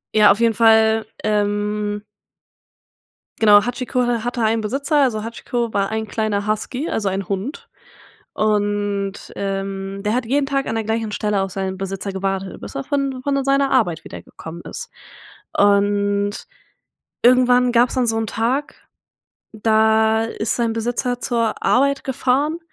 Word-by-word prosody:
Ja, 210 -2 +7
auf 205 - +1
jeden 230 -1 +3
Fall, 220 0 +4 0.2
ähm 210 0 -1 1.3
Genau. 205 -2 +6
Hachiko 250 0 -2
ha 235 -2 0
hatte 245 0 -2
einen 225 0 +2
Besitzer. 275 +8 -1
Also, 225 -6 +1
Hachiko 235 0 -3
war 195 -1 +1
ein 220 0 -3
kleiner 210 -1 -1
Husky, 245 +7 -2
also, 205 -3 -1
ein 190 -1 -3
Hund 200 - -4 0.7
und, 205 -1 -1
ähm, 195 0 -4
der 210 +2 0
hat 250 0 0
jeden 275 +4 +1
Tag 275 -1 -1
an 225 - -2
der 225 - -1
gleichen 220 -1 -2
Stelle 210 -2 0
auf 195 - -3
seinen 190 0 -3
Besitzer 195 +1 -4
gewartet, 195 0 -3
bis - - -9
er 135 - -4
von 275 -2 -1
von 275 0 0
seiner 275 0 +2
Arbeit 175 -11 +1
wiedergekommen 165 +1 -10
ist. - - -7 0.7
Und 205 0 +2 0.8
irgendwann 250 0 +5
gab's 240 +1 +3
dann 255 -2 +1
so 225 0 +1
'n 225 - -1
Tag, 245 +7 -1 0.8
da 220 0 +3
ist 225 -1 -2
sein 235 -2 0
Besitzer 245 +2 -2
zur 230 -3 -1
Arbeit 280 +2 +2
gefahren 270 +5 0
220 Hz, 150 wpm, -20 LUFS, 205-245 Hz, 1.3 s, Ja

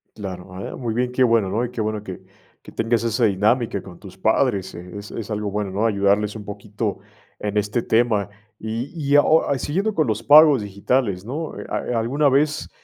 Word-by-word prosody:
Claro, 95 -3 -7
a 90 - -8
ver, - - -6
muy 120 -4 -3
bien, 125 +1 -1
qué 130 +1 +2
bueno, 115 -5 +3
¿no? 115 +5 0
Y 120 - -7
qué 120 -3 -4
bueno 110 -1 -2
que 95 -2 -8 0.4
que - - -13
tengas 115 0 0
esa 115 +1 +1
dinámica 105 +1 +1
con 90 -3 -12
tus - - -12
padres, 95 -2 +1
eh, 90 +1 -10
es 100 0 -8
es 110 -1 -6
algo 105 -1 -2
bueno, 105 -1 -2
¿no? 100 +4 0
Ayudarles 100 0 +1
un 105 -2 -8
poquito 105 +1 -4 0.4
en 105 0 -3
este 105 +3 0
tema. 110 -3 +1 0.3
Y 115 +5 -4
y 145 -3 0
a 145 - +8
o 155 -3 +3
siguiendo 195 - -1
con 155 - +2
los 110 -1 -1
pagos 145 0 +7
digitales, 100 0 -1
¿no?, 150 +7 -5
eh, - - -7
¿a 120 -2 -2
alguna 140 +6 +2
vez, 145 +3 +1
110 Hz, 210 wpm, -22 LUFS, 100-125 Hz, 0.4 s, a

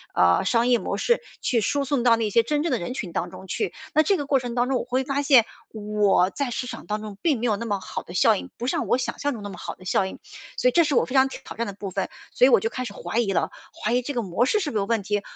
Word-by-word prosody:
呃， 90 0 +4
商 235 +1 +2
业 245 -2 +4
模 - - -3
式 475 0 +2 0.2
去 235 -3 +1
输 280 +5 0
送 265 -2 0
到 235 -1 +5
那 220 -2 -1
些 230 - +5
真 295 +6 -1
正 335 - -1
的 - - +1
人 250 +9 -5
群 180 -9 -5
当 175 - -2
中 190 +1 -11
去。 415 - -2 0.2
那 310 - +5
这 390 +3 +2
个 290 - -3
过 275 -1 +2
程 245 -1 -5
当 245 +1 +2
中 265 -2 +1
我 - - -3
会 255 +2 -1
发 280 +1 -1
现， 265 -5 +6 0.3
我 205 -3 +2
在 280 -3 -2
市 245 +2 -3
场 - - -8
当 210 +1 -3
中 205 -2 -8
并 295 -9 +2
没 245 - -2
有 215 -3 +2
那 230 +3 -5
么 200 -2 -1
好 - - -6
的 175 - -11
效 220 +3 +5
应， - - -6
不 240 - -4
像 260 - -1
我 245 - +3
想 - - -3
象 290 -1 0
中 210 - -8
那 205 - -5
么 185 - -9
好 - - -6
的 185 - -16
效 190 +1 +1
应。 - - -8 0.4
所 250 - +4
以 - - -1
这 335 +2 +4
是 290 - 0
我 - - +4
非 260 - -6
常 265 0 +5
挑 - - -9
挑 - - -10
战 235 -1 -2
的 200 - -5
部 195 -1 -7
分， 195 - -2 0.2
所 250 - +4
以 - - +6
我 200 - +5
就 225 - 0
开 255 +1 -4
始 200 - -6
怀 230 - -3
疑 200 -5 +1
了， - - +1 0.3
怀 215 - +1
疑 250 - +3
这 285 +3 -4
个 240 - 0
模 200 +5 0
式 425 +8 +1
是 295 -5 -2
不 220 - -2
是 - - +2
有 195 - 0
问 225 -2 0
题、 205 +1 -1
235 Hz, 355 characters per minute, -24 LUFS, 205-265 Hz, 0.4 s, 现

